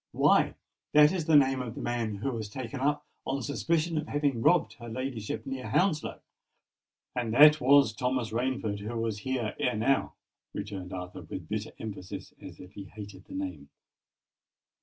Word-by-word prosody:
"Why, - - +4 0.4
that 150 0 +7
is 180 -4 -2
the 160 -1 +4
name 135 -2 +5
of 120 -2 -6
the - - -6
man 115 -3 -1
who 110 +7 -2
was 110 -4 -4
taken 130 +4 -6
up 145 +2 0 0.2
on 135 -1 -2
suspicion 160 +4 0
of 155 - -5
having 145 -5 0
robbed 175 +6 +3
her 120 -1 -8
ladyship 115 -3 -4
near 135 -1 -5
Hounslow!" 180 -6 +1 0.9
"And 120 -3 -1
that 150 +2 +8
was 135 -3 +5
Thomas 125 -2 -1
Rainford 115 -3 -1
who 110 +3 -5
was 115 -2 -2
here 125 -3 -2
ere 125 - +1
now!" 135 +5 +1 0.4
returned 100 -3 -5
Arthur, 90 -1 -6
with - - -8
bitter - - -4
emphasis, 100 -4 -7
as - - -10
if 90 - -11
he 100 - -8
hated 100 0 -10
the 285 - -10
name. 285 -1 -5
125 Hz, 170 wpm, -29 LUFS, 110-145 Hz, 0.9 s, that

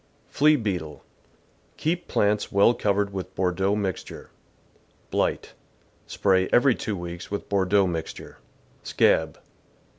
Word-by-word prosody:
Flea 150 +1 +4
Beetle. 90 - -4 0.4
— - - -37
Keep 170 +3 -2
plants 105 0 0
well 100 +4 +5
covered 100 -2 0
with 95 -1 -6
Bordeaux 95 +2 0
mixture. 95 -4 -5 0.8
Blight. - - -1 0.3
— - - -36
Spray 95 -2 +1
every 130 +1 +5
two 105 -3 -4
weeks 85 0 -7
with 100 - -5
Bordeaux 100 0 +2
mixture. 85 -3 -6 0.4
Scab. 80 -2 +1
100 Hz, 120 wpm, -25 LUFS, 90-105 Hz, 0.8 s, well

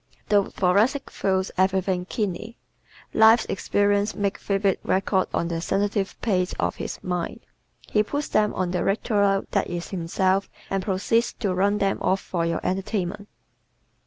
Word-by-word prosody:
The 205 -2 +4
Thoracic 210 +10 +1
feels 190 -1 0
everything 190 -1 +1
keenly. 215 +3 -3 0.6
Life's 220 +1 +6
experiences 205 +1 +1
make 200 -1 -1
vivid 195 -1 0
records 190 0 +1
on 170 - 0
the 165 -1 -3
sensitive 200 +2 -1
plate 185 -5 +1
of - - -1
his - - -5
mind. 180 -2 -3 0.4
He 210 - +2
puts 285 +7 -2
them 210 -1 +2
on 180 -1 -1
the 180 -1 -1
Victrola 200 -1 +2
that - - +1
is 175 -1 -5
himself 190 +2 0 0.2
and 195 -1 0
proceeds 200 +5 +1
to 195 -4 -2
run 200 +3 +2
them 195 -1 0
off 190 - +2
for 170 -3 -2
your 165 - -1
entertainment. 190 +1 -2
195 Hz, 150 wpm, -24 LUFS, 185-205 Hz, 0.6 s, Life's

